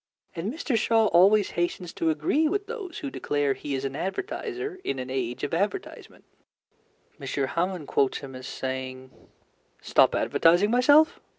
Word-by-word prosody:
And 180 +6 -3
Mr. 290 -3 -2
Shaw 225 0 +3
always 195 +4 +5
hastens 175 0 -2
to 165 - 0
agree 160 - +1
with 405 +5 -1
those 410 -7 -7
who 280 - -5
declare 145 - 0
he 140 +1 -5
is 135 +1 -3
an 135 0 -4
advertiser 390 - -4
in 135 - -2
an 130 0 -5
age 125 -2 -3
of - - -3
advertisement. - - -3 1.0
M. - - -7
Hamon 165 +5 -2
quotes 135 -1 +1
him 135 -2 -9
as 130 0 -8
saying: 130 0 -5 0.7
Stop - - +3
advertising 175 +6 +3
myself! 290 +7 +5
175 Hz, 155 wpm, -26 LUFS, -, 1.0 s, always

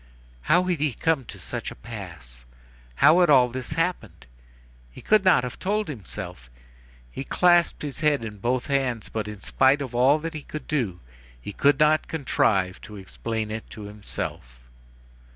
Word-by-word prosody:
How 180 +2 +5
had 180 -3 -1
he 145 -3 +1
come 155 0 0
to - - -10
such - - -5
a - - -10
pass? - - -10 0.5
How 155 - +6
had 175 -2 +4
all 125 -4 +6
this 130 +4 -5
happened? 165 +3 -2 0.7
He - - -12
could 215 -2 +3
not 185 -9 +5
have 125 - -6
told 210 +2 -1
himself. 90 - -8 0.6
He 135 - -5
clasped 175 +3 +3
his 145 -3 -5
head 150 -6 +1
in 105 -2 -8
both 125 +4 -1
hands, 135 -5 -1
but 110 -1 -3
in 105 -2 -8
spite 135 +2 +3
of 135 -4 -5
all 130 +5 +4
that 165 +2 -5
he 155 - -6
could 150 +1 -8
do, 115 - -2 0.4
he 100 - -8
could 140 +4 +3
not 155 +1 +3
contrive 100 - 0
to 105 - -11
explain 100 - -4
it 110 +1 -6
to 105 - -9
himself. 100 - -6
130 Hz, 170 wpm, -25 LUFS, 105-155 Hz, 0.7 s, How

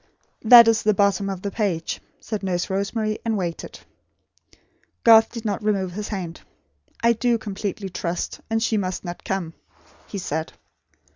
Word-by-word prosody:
"That 235 0 +9
is 225 -1 +3
the 215 -1 +2
bottom 200 0 +2
of 190 -2 -5
the 200 - -3
page," 195 -7 -2 0.2
said 215 -2 -5
Nurse 180 -2 -2
Rosemary; 215 +2 -1
and 225 -2 0
waited. 175 -3 -5 1.2
Garth 225 -1 +7
did 230 -1 -7
not 205 -1 -1
remove 195 -3 0
his 210 +4 -5
hand. 180 -5 -5 0.6
"I 235 0 +5
do 235 +1 +1
completely 200 -1 -5
trust; 175 -1 -4
and 225 0 0
she 225 -1 +1
must 185 -1 -3
not 175 0 -7
come," 185 -4 -3 0.5
he 205 - -6
said. 160 -3 -3
200 Hz, 155 wpm, -23 LUFS, 185-220 Hz, 1.2 s, That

